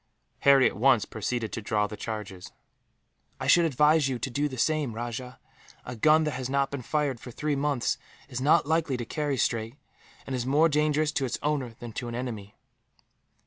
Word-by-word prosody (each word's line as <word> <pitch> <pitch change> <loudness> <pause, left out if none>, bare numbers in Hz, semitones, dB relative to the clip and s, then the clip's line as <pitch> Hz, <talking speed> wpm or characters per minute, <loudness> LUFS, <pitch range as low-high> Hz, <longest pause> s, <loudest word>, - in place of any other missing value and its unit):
Harry 135 -1 +6
at - - -3
once 120 0 +4
proceeded 110 +1 -3
to 115 - -3
draw 105 0 0
the 105 - -6
charges. 100 -4 -6 0.9
"I - - -4
should 170 -1 +5
advise 150 0 +3
you 130 - -2
to 130 +2 -4
do 145 +4 0
the 130 - -7
same, 150 -1 0
Rajah. 120 +2 -6 0.5
A 120 - -6
gun 155 +7 +4
that 150 - -1
has 130 -2 -4
not 140 0 +1
been 140 -2 -4
fired 145 -1 -1
for 125 - -10
three 150 +4 -2
months 140 -3 0 0.3
is 125 0 -5
not 145 +2 +4
likely 160 -3 0
to 120 - -4
carry 145 +2 -2
straight, 115 0 -1 0.5
and 135 - -3
is 125 - -2
more 145 +6 +3
dangerous 150 0 +1
to 140 -3 -1
its 125 - -2
owner 140 -6 -1
than 120 -2 -9
to 120 - -5
an 120 - -5
enemy." 110 -5 -6
130 Hz, 195 wpm, -27 LUFS, 120-150 Hz, 0.9 s, Harry